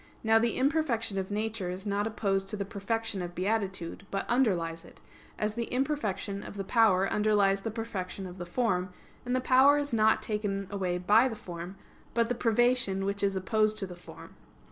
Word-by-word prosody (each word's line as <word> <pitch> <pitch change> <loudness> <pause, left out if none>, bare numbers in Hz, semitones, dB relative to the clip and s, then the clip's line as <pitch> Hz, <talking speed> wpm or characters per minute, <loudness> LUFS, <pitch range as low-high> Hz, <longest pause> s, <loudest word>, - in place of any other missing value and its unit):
Now 225 0 +5
the 230 +1 0
imperfection 260 -8 +1
of 190 - -4
nature 210 -2 -2
is 185 +3 -5
not 205 +1 0
opposed 195 -3 -1
to 210 - -2
the 200 - -2
perfection 220 0 -3
of 175 0 -6
beatitude, 190 -3 -2
but 195 - -3
underlies 175 -10 +1
it; - - -16 0.4
as 210 0 -1
the 235 +1 -2
imperfection 245 -7 -1
of 205 - -9
the 195 - -2
power 195 -3 +4
underlies 205 -2 +2
the 225 - -3
perfection 200 -4 -5
of 180 0 -9
the 175 - -4
form, 185 -3 0 0.4
and 250 - +1
the - - +2
power 265 +3 +5
is 290 -3 -2
not 220 -1 +3
taken 205 -2 -2
away 185 -3 -1
by 210 +7 +4
the 235 - -4
form, 175 -2 -8 0.4
but 230 -1 +2
the - - +2
privation 235 -4 +1
which 200 0 -2
is 200 -1 +1
opposed 215 +3 +1
to 205 - -2
the 180 -2 -9
form. 175 - -13
205 Hz, 190 wpm, -29 LUFS, 190-230 Hz, 0.4 s, Now